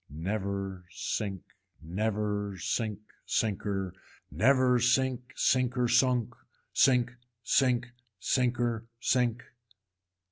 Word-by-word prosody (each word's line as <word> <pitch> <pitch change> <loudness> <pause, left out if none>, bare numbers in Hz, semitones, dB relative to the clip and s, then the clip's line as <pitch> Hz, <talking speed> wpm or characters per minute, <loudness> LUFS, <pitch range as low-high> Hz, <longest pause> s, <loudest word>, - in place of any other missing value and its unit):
Never 95 +3 -3
sink, 95 +1 -3 0.4
never 105 +2 -2
sink 105 +2 -2 0.2
sinker, 100 -3 -1 0.4
never 130 +1 +4
sink 125 +1 +1
sinker 125 -1 +2
sunk, 125 -1 +3 0.4
sink 125 -2 +3 0.3
sink 120 -2 +2 0.3
sinker 120 -1 0
sink. 120 -1 +1
115 Hz, 75 wpm, -30 LUFS, 100-125 Hz, 0.4 s, never